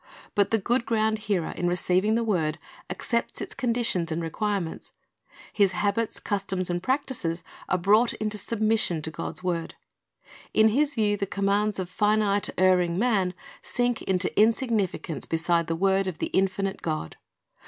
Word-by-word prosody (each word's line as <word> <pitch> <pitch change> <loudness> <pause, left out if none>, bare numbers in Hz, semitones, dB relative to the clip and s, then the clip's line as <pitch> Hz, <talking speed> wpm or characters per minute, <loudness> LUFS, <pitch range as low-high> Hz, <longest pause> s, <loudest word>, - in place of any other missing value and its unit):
'But 200 -1 +2
the 225 - +3
good 235 +3 0
ground 220 -1 +1
hearer, 180 -5 0
in 175 - -2
receiving 180 +4 +2
the 235 - +1
word, 165 -8 0 0.3
accepts 235 -1 -2
all - - -2
its - - -7
conditions 230 -9 0
and 160 - -1
requirements. 175 +1 -3 0.6
His 200 -3 +3
habits, 205 +4 0
customs, 190 -3 -2
and 175 0 -1
practises 230 - -1 0.3
are 185 - +2
brought 210 +6 +4
into 215 -1 -2
submission 215 -6 +1
to 160 - -3
God's 180 - -5
word. 170 -2 -2 0.8
In 220 0 +6
his 285 +5 +1
view 210 -3 +2
the 200 - -2
commands 200 +2 0
of 185 -2 -3
finite, 210 +1 +1
erring 180 -2 +3
man 195 -5 +1 0.3
sink 245 -1 -1
into 185 0 0
insignificance 215 - +1
beside 170 0 +1
the 165 - -1
word 195 +2 +2
of 180 -4 -4
the - - -3
infinite 195 0 0
God. 155 - -3
200 Hz, 155 wpm, -26 LUFS, 180-220 Hz, 0.8 s, In